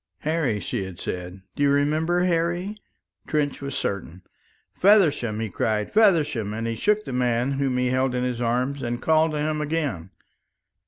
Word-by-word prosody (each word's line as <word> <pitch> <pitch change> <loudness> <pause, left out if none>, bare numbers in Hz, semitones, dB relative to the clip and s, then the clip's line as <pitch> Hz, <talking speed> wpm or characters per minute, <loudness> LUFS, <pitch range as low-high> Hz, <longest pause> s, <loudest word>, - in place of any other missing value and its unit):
"Harry," 150 -9 0
she 100 - -3
had 95 -2 -8
said. 90 +1 -6
"Do - - -5
you 145 - +4
remember, 155 +5 +2
Harry?" 175 +3 0 0.5
Trench 145 -2 -1
was 140 -1 -5
certain. 95 -2 -4 0.5
"Feversham!" 155 - +3
he 110 - -2
cried. 105 +2 -1
"Feversham!" 150 - +3
And 115 +1 -3
he 115 0 -2
shook 210 - +1
the 135 - -5
man 125 +1 +1
whom 135 -2 0
he 125 0 +1
held 130 0 +1
in 125 - 0
his 125 -1 -2
arms 125 +4 0
and 120 -1 -3
called 160 +1 +2
to - - -2
him 155 +1 -1
again. 145 - -2
135 Hz, 170 wpm, -24 LUFS, 115-155 Hz, 0.5 s, you